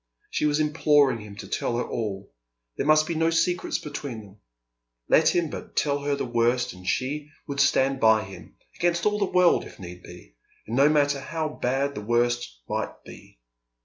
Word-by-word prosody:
She 150 - +1
was 150 0 +1
imploring 150 -4 +3
him 105 -1 -10
to 105 - -9
tell 120 - -2
her 120 - 0
all; 100 -3 -4 0.4
there - - -2
must 155 0 +5
be 170 - -3
no 165 0 +2
secrets 165 +2 0
between 140 -6 -6
them; 100 -1 -16 0.7
let - - +4
him 170 -3 +1
but - - -8
tell 145 -1 +1
her 145 0 -1
the 140 - -3
worst 120 +1 +1
and 90 0 -13
she 145 +7 -2 0.2
would 140 -1 -4
stand 135 -1 +3
by 110 -2 +4
him, 95 -2 -12 0.2
against 170 0 0
all 210 0 +2
the 200 - +2
world 180 -2 +3
if - - -12
need 90 -1 -9
be, 90 -11 -14 0.3
and 115 - -4
no 140 +3 +5
matter 145 -2 +2
how 160 +3 -3
bad 140 0 -1
the 105 - -6
worst 120 - -1
might - - -4
be. - - -14
140 Hz, 190 wpm, -25 LUFS, 115-150 Hz, 0.7 s, must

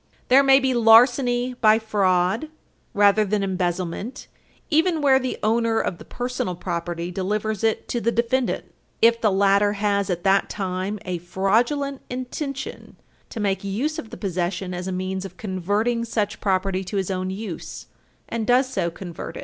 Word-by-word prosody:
There 260 +2 +7
may 270 -1 +6
be 265 -1 +1
larceny 245 +2 +5
by 215 0 +6
fraud, 200 +3 +1 0.4
rather 205 +1 +4
than 205 0 0
embezzlement 185 +5 -3 0.5
even 325 +2 +3
where 270 -3 +4
the 255 -1 -3
owner 225 +1 +2
of 170 - -2
the - - -11
personal 245 -7 -3
property 170 0 -4
delivers 210 +3 -2
it 225 -1 0
to 240 - -1
the 235 - +1
defendant, 240 +2 0 0.4
if 230 0 +5
the 215 - +4
latter 200 +1 +3
has, 200 -1 0
at 175 -1 -2
that 195 0 +3
time, 190 +1 -3
"a 180 -2 -3
fraudulent 240 - 0
intention 265 +2 -6 0.3
to - - -7
make 195 -2 -1
use 260 - -2
of 225 - -8
the - - -9
possession 180 -1 -2
as 180 +1 -5
a - - -2
means 185 +1 -3
of 185 -2 -9
converting 205 +5 -1
such 220 -2 -2
property 190 -1 0
to 200 +3 -4
his 195 0 -1
own 185 0 -2
use, 190 -2 -6 0.4
and 225 -2 -3
does 255 +2 +4
so 215 -9 -1
convert 170 0 -8
it." - - -6
205 Hz, 165 wpm, -23 LUFS, 185-240 Hz, 0.5 s, There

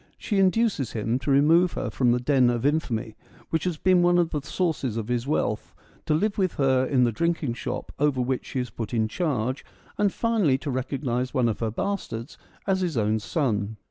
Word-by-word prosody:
She 205 -3 -1
induces 195 - +2
him 115 +3 -1
to 140 - -4
remove 160 +6 +4
her 120 - -3
from 120 +1 +2
the 125 - +2
den 130 -1 +3
of 120 +1 -1
infamy 120 -8 -1 0.4
which 160 +1 0
has 175 -3 -1
been 185 +2 +4
one 175 0 +4
of 170 -2 +2
the 150 - -2
sources 140 - -2
of 115 0 -4
his 120 +1 -1
wealth, 110 -8 -1 0.3
to 155 - +3
live 205 +6 0
with 185 -3 +1
her 130 -2 +3
in 130 -3 +3
the 120 - +3
drinking 165 0 -1
shop 120 - -5
over 145 -2 +2
which 125 +1 -1
she 135 - -3
is 125 -1 -3
put 115 +1 -5
in 110 -1 +2
charge, 130 -2 -2 0.4
and 205 -1 +3
finally 210 - +2
to 140 +1 -4
recognise 130 0 -2
one 125 -3 +3
of 105 -3 -2
her 115 - -1
bastards 120 - -4 0.3
as 190 -1 +1
his 175 -7 -1
own 110 0 +1
son. 110 -4 -1
135 Hz, 205 wpm, -25 LUFS, 120-170 Hz, 0.4 s, remove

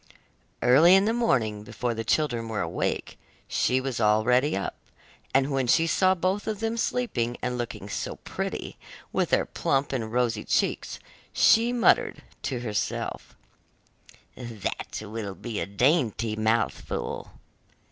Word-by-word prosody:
Early 155 +9 +7
in 195 +1 +4
the 225 - +2
morning 120 - +1
before 115 +3 -3
the 115 0 -4
children 120 -1 0
were 110 -2 -2
awake, - - -2 0.3
she 130 - +1
was 130 -3 -3
already 115 +5 +3
up, 100 - -3 0.6
and 135 +2 +2
when 135 -2 0
she 165 +7 +4
saw 185 +2 +3
both 185 +3 -1
of 215 -2 -2
them 225 0 -1
sleeping 175 - -1
and 125 0 -1
looking 120 -1 -5
so - - -4
pretty, - - -5 0.3
with - - +1
their - - +3
plump 135 0 -1
and 115 -4 -2
rosy 115 -3 0
cheeks - - 0 0.4
she 230 +2 +5
muttered 245 -2 +3 0.2
to 125 -4 -3
herself: 105 -4 -3 1.0
'That 115 -3 -5
will 105 -2 -5
be 115 -1 -5
a 85 - -2
dainty 115 - +1
mouthful! 110 +2 -1
125 Hz, 135 wpm, -26 LUFS, 110-160 Hz, 1.0 s, Early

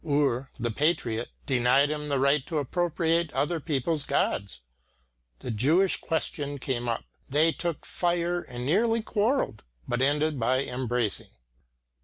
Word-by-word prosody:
Ur, 140 -4 +1
the 120 0 -1
patriot, 120 -4 0 0.2
denied 135 +3 +3
him 150 -1 -3
the 140 -1 0
right 140 +1 +3
to 165 - -2
appropriate 165 +2 0
other 165 +3 0
people's 150 0 0
gods. 95 -9 -1 0.8
The 125 - -4
Jewish 155 - +3
question 145 -3 -2
came 125 -2 -2
up; 115 - -2 0.2
they 155 +4 +4
took 170 -2 -4
fire 175 0 0
and 125 -4 -7
nearly 225 - +2
quarrelled, 220 - 0 0.3
but 120 +1 -1
ended 145 +1 +2
by 130 +3 +2
embracing. 125 -4 0
145 Hz, 135 wpm, -27 LUFS, 125-165 Hz, 0.8 s, they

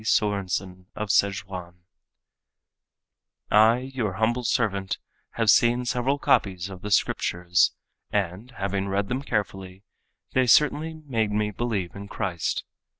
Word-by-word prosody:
Sörensen 95 -4 0
of 105 -1 -4
Szechuan: 95 -3 0 1.8
"I, 115 +5 +4
your 110 -7 -1
humble 115 +5 0
servant, 100 -5 0 0.4
have 115 -2 +4
seen 120 +1 +3
several 125 +3 0
copies 95 -8 +1
of 95 -1 -9
the 105 - -5
Scriptures 90 -3 +2 0.4
and, 100 +3 -2
having 100 0 -1
read 100 +1 -1
them 130 +2 -1
carefully, 95 -6 -3 0.5
they 130 -1 +3
certainly 150 +5 +4
made 110 -6 0
me 105 0 0
believe 105 -5 -3
in 100 0 -8
Christ. 90 -6 -2
105 Hz, 120 wpm, -25 LUFS, 95-120 Hz, 1.8 s, I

